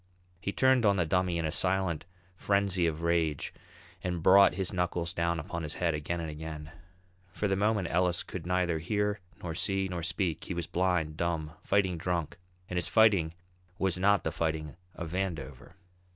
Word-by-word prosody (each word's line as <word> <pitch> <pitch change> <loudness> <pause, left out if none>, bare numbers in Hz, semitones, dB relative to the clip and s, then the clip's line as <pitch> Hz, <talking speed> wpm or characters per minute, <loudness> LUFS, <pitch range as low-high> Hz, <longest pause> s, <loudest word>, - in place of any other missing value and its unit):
He 100 - -2
turned 130 +2 +4
on 100 -2 +4
the 90 -3 +1
Dummy 90 +1 +1
in 85 - -1
a 80 - -1
silent 90 -2 +1 0.3
frenzy 100 -2 +1
of 80 0 -3
rage 80 -4 0 0.5
and 90 -2 -2
brought 100 +1 +7
his 95 -1 -1
knuckles 90 -2 -1
down 85 0 0
upon 85 +1 -4
his 80 -1 -3
head 85 -2 +1
again 75 +3 -2
and 80 - -3
again. 75 0 -7 0.6
For 105 - -1
the 95 - +1
moment 105 -2 +1
Ellis 90 0 +2
could - - -7
neither 90 -3 +1
hear, 105 +4 0 0.2
nor 85 -2 -3
see, 95 +3 0
nor 90 -2 -4
speak; 85 0 -1
he 90 - -4
was 85 -1 -2
blind, 85 -4 0
dumb, 85 -3 -1
fighting 95 -4 +1
drunk, 85 -1 -2 0.3
and 90 - -4
his 90 - +2
fighting 100 -8 +4 0.4
was 95 -1 0
not 100 +1 +4
the - - -1
fighting 80 -2 -2 0.2
of 85 -2 -6
Vandover. 90 -2 -4
90 Hz, 180 wpm, -30 LUFS, 80-95 Hz, 0.6 s, brought